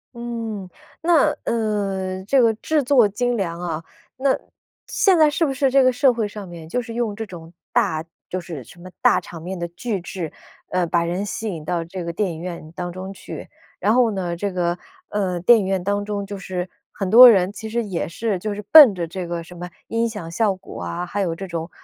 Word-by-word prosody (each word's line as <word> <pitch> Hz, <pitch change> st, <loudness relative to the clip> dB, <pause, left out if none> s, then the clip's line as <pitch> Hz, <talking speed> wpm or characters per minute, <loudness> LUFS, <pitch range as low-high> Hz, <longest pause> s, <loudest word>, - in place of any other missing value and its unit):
嗯。 230 Hz, -5 st, -5 dB, 0.3 s
那， 330 Hz, -2 st, +4 dB, 0.2 s
呃， 195 Hz, -4 st, -1 dB
这 265 Hz, +5 st, +4 dB
个 230 Hz, -2 st, +4 dB
制 300 Hz, +5 st, 0 dB
作 245 Hz, -5 st, +5 dB
精 245 Hz, +4 st, -1 dB
良 170 Hz, -3 st, -2 dB
啊， 165 Hz, -2 st, -3 dB, 0.3 s
那 270 Hz, 0 st, +2 dB, 0.5 s
现 380 Hz, -4 st, +3 dB
在 310 Hz, -1 st, +6 dB
是 325 Hz, +3 st, +1 dB
不 270 Hz, -, -1 dB
是 270 Hz, 0 st, +2 dB
这 270 Hz, -1 st, +5 dB
个 255 Hz, -, +5 dB
社 255 Hz, +1 st, +4 dB
会 225 Hz, -3 st, -1 dB
上 205 Hz, -1 st, -8 dB
面， 170 Hz, -2 st, -10 dB
就 250 Hz, +7 st, 0 dB
是 230 Hz, -1 st, -8 dB
用 230 Hz, -3 st, -1 dB
这 225 Hz, -, -4 dB
种 170 Hz, -4 st, -11 dB, 0.2 s
大 160 Hz, 0 st, +1 dB, 0.3 s
就 185 Hz, -, -2 dB
是 155 Hz, -5 st, -7 dB
什 175 Hz, +9 st, -16 dB
么 185 Hz, -, -10 dB
大 -, -, +5 dB
场 165 Hz, -, -10 dB
面 185 Hz, +3 st, -5 dB
的 170 Hz, 0 st, -3 dB
巨 195 Hz, +4 st, -3 dB
制， 175 Hz, -2 st, -5 dB, 0.4 s
呃， 180 Hz, -1 st, +1 dB
把 170 Hz, 0 st, +2 dB
人 180 Hz, +4 st, -2 dB
吸 220 Hz, +1 st, -4 dB
引 165 Hz, -5 st, -5 dB
到 170 Hz, -1 st, -1 dB
这 175 Hz, +2 st, -6 dB
个 170 Hz, -, -3 dB
电 190 Hz, 0 st, 0 dB
影 160 Hz, -, -8 dB
院 170 Hz, -3 st, -7 dB
当 175 Hz, -1 st, -4 dB
中 185 Hz, +2 st, -7 dB
去。 -, -, -9 dB, 0.3 s
然 215 Hz, -, +3 dB
后 240 Hz, -3 st, +4 dB
呢， 180 Hz, -3 st, -2 dB
这 200 Hz, +3 st, -2 dB
个， 175 Hz, -1 st, 0 dB, 0.3 s
呃， 185 Hz, -4 st, -1 dB
电 230 Hz, +5 st, +7 dB
影 195 Hz, -, -2 dB
院 190 Hz, -2 st, -1 dB
当 205 Hz, +1 st, 0 dB
中， 205 Hz, -1 st, -3 dB
就 200 Hz, 0 st, -6 dB
是 185 Hz, -1 st, -4 dB, 0.2 s
很 195 Hz, -2 st, -3 dB
多 245 Hz, +3 st, +11 dB
人 190 Hz, -3 st, +4 dB
其 220 Hz, +1 st, -7 dB
实 235 Hz, +1 st, -1 dB
也 190 Hz, -5 st, -3 dB
是 200 Hz, +2 st, -2 dB
就 210 Hz, +2 st, -3 dB
是 210 Hz, -, -5 dB
奔 285 Hz, -11 st, +10 dB
着 170 Hz, -2 st, -3 dB
这 180 Hz, +1 st, -5 dB
个 170 Hz, -1 st, -3 dB
什 180 Hz, +1 st, -13 dB
么 180 Hz, +1 st, -7 dB, 0.2 s
音 230 Hz, 0 st, 0 dB
响 180 Hz, -7 st, -7 dB
效 200 Hz, +1 st, +1 dB
果 185 Hz, -, -10 dB
啊， 175 Hz, +1 st, -3 dB
还 200 Hz, +3 st, -3 dB
有 170 Hz, -3 st, -1 dB
这 195 Hz, +3 st, -6 dB
种 165 Hz, -1 st, -4 dB
195 Hz, 245 characters per minute, -22 LUFS, 175-225 Hz, 0.5 s, 多